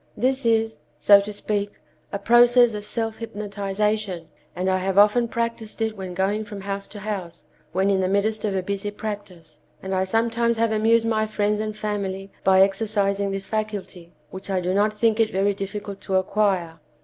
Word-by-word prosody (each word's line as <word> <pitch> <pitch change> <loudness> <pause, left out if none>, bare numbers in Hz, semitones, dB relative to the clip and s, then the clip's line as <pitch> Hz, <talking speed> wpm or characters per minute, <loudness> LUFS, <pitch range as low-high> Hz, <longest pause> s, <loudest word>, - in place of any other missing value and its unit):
This 260 0 +1
is, 225 -1 +1 0.2
so 200 -1 +7
to 205 +1 -6
speak, 205 0 -2 0.4
a 200 - -2
process 240 +2 +5
of 210 0 -5
self 225 0 -3
hypnotization, 205 -4 -3 0.3
and 180 +2 -2
I 185 0 +2
have 190 +1 -2
often 210 +4 +5
practiced 230 -1 -3
it 220 -1 -1
when 190 -3 -7
going 200 +3 0
from 205 -2 -8
house 195 0 -4
to 210 - -10
house, 195 -5 -5 0.3
when 190 +3 +1
in 195 - +2
the 185 - +1
midst 205 +3 0
of 205 -3 -1
a 190 - -1
busy 200 +2 -3
practice, 185 -8 -8 0.2
and 190 0 -5
I 190 0 +1
sometimes 230 +3 +1
have 230 0 +1
amused 225 +1 +3
my 215 -1 +1
friends 210 -1 0
and 215 0 -3
family 195 -2 -3
by 190 0 +5
exercising 200 0 +1
this 195 0 -3
faculty, 205 -5 -4 0.2
which 190 +1 -8
I 190 -1 +1
do 180 +1 -1
not 205 +2 +3
think 225 0 +2
it 225 -1 +3
very 195 +2 +1
difficult 200 0 -6
to 190 - -2
acquire. 185 -4 0
205 Hz, 185 wpm, -23 LUFS, 195-220 Hz, 0.4 s, so